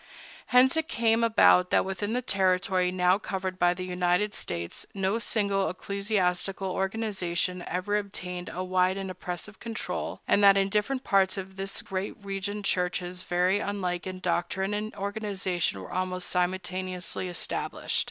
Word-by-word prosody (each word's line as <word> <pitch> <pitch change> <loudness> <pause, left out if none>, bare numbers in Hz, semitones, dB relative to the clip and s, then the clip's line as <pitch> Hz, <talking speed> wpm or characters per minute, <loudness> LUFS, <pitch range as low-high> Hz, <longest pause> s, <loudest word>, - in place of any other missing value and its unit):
Hence 255 +3 +6
it 320 -1 0
came 230 0 +2
about 205 -5 +5
that - - +3
within 195 +3 -2
the 250 +1 0
territory 185 -3 +2
now 180 +1 +3
covered 190 -2 -4
by 175 0 +4
the 185 0 -5
United 180 +3 +1
States 85 -1 -4
no 195 +3 +1
single 200 -3 +1
ecclesiastical 195 -1 -1
organization 190 -3 -1
ever 185 +4 0
obtained 180 -3 -6
a 185 - -3
wide 185 +1 +2
and 190 -1 -4
oppressive 180 +3 -7
control, 230 -1 -4
and 205 - +4
that 200 0 +8
in 195 0 +2
different 220 +6 0
parts 195 0 +3
of 190 0 -6
this 195 0 -3
great 190 +1 -3
region 200 +1 -3
churches 180 -1 -1
very 180 +3 +2
unlike 185 -4 -2
in 185 0 -5
doctrine 185 +3 0
and 210 +1 -3
organization 195 - -1
were 95 - -9
almost 185 0 -1
simultaneously 185 0 -2
established. 175 -1 -1
190 Hz, 150 wpm, -28 LUFS, 180-205 Hz, -, that